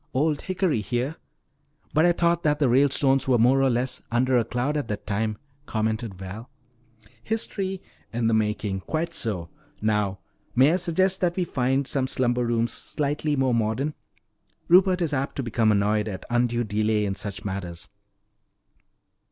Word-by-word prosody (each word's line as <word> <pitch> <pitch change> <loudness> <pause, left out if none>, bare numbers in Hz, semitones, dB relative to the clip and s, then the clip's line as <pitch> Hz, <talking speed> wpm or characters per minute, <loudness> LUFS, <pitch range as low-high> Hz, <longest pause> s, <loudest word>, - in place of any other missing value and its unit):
'Old 150 +2 +1
Hickory' 185 - 0
here! 120 - -2 0.8
But 155 +3 +4
I - - +5
thought 170 0 +1
that 150 -2 +2
the 145 -3 +2
Ralestones 135 +1 +3
were 130 -2 +4
more 125 +4 +4
or 135 - +4
less 125 +1 0
under 125 +2 +2
a 120 - +4
cloud 125 +6 -2
at 145 -5 -2
that 105 -2 -5
time," 110 +1 -1 0.3
commented 110 -1 -2
Val. 95 +6 -8 0.7
"History 195 - -3
" - - -35
"In 115 0 -1
the 115 - +3
making. 105 -2 0
Quite 165 - -3
so. 90 - -2 0.3
Now 105 -2 0 0.4
may 135 +6 +5
I - - +3
suggest 185 +2 +1
that 175 -1 +1
we 185 - +1
find 135 -3 0
some 130 -1 0
slumber 125 -2 +1
rooms 115 0 0
slightly 150 +1 -1
more 130 -2 +2
modern? 115 +6 0 0.7
Rupert 180 0 +5
is 155 -3 -1
apt 135 0 -2
to 135 - -2
become 115 -2 +2
annoyed 105 +1 +1
at 95 -3 -6
undue 120 0 +1
delay 105 0 0
in 100 - -1
such 100 0 -6
matters." 90 -3 -5
125 Hz, 165 wpm, -25 LUFS, 110-150 Hz, 0.8 s, I